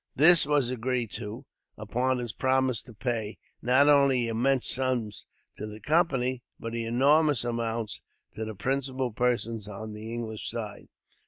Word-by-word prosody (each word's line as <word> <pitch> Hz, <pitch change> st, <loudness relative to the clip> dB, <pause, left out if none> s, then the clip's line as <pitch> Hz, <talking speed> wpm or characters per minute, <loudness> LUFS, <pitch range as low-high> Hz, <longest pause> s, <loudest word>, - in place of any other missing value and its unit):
This 160 Hz, +2 st, +6 dB
was 145 Hz, -4 st, +2 dB
agreed 125 Hz, -2 st, -2 dB
to, 115 Hz, +4 st, -7 dB, 0.3 s
upon 125 Hz, +5 st, -1 dB
his 120 Hz, -3 st, -4 dB
promise 130 Hz, -3 st, +1 dB
to 120 Hz, -, -13 dB
pay, 115 Hz, -2 st, -3 dB, 0.2 s
not 130 Hz, +4 st, +4 dB
only 140 Hz, -4 st, +4 dB
immense 125 Hz, +3 st, +1 dB
sums 125 Hz, -6 st, +1 dB, 0.3 s
to 105 Hz, -, -4 dB
the 105 Hz, 0 st, -9 dB
Company, 135 Hz, -4 st, +1 dB, 0.2 s
but 115 Hz, 0 st, -6 dB
enormous 130 Hz, +4 st, +3 dB
amounts 115 Hz, -2 st, -3 dB, 0.3 s
to 110 Hz, -, -5 dB
the 110 Hz, -1 st, -5 dB
principal 130 Hz, +3 st, -2 dB
persons 115 Hz, -2 st, -1 dB
on 105 Hz, +1 st, -7 dB
the 110 Hz, +2 st, -7 dB
English 115 Hz, -2 st, -5 dB
side. -, -, -6 dB
120 Hz, 145 wpm, -28 LUFS, 110-130 Hz, 0.3 s, This